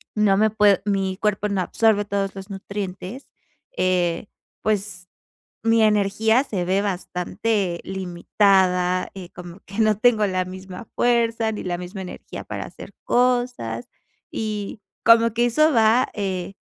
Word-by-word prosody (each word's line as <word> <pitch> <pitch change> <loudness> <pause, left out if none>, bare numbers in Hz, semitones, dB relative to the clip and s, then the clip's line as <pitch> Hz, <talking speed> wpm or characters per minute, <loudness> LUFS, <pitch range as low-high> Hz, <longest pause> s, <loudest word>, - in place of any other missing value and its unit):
no 205 -2 +3
me 220 +1 +4
puedo 205 -2 +4
mi 195 -2 0
cuerpo 210 -1 0
no 200 -2 -1
absorbe 205 +1 +2
todos 195 -1 -2
los 195 +1 -9
nutrientes, 195 +4 -6 0.5
eh, 180 0 +1 0.3
pues, 200 -4 -2 0.6
mi 225 0 +4
energía 215 +4 +3
se 190 -8 -3
ve 190 +2 +1
bastante 190 0 -2
limitada, 185 0 +1
eh, 180 -2 -9
como 175 +1 -10
que 200 +3 -10
no 215 -2 +3
tengo 220 -2 +4
la 185 -1 0
misma 185 +3 -9
fuerza, 230 -2 +2
ni 210 - -6
la 175 -1 -2
misma 185 +2 -7
energía 180 - -8
para - - -5
hacer - - -12
cosas, 245 - 0 0.4
y 210 -1 -4 0.2
como 230 0 +6
que 240 +1 +2
eso 305 +6 +3
va, 225 0 +4
eh, 190 -2 -3
200 Hz, 140 wpm, -23 LUFS, 185-220 Hz, 0.6 s, como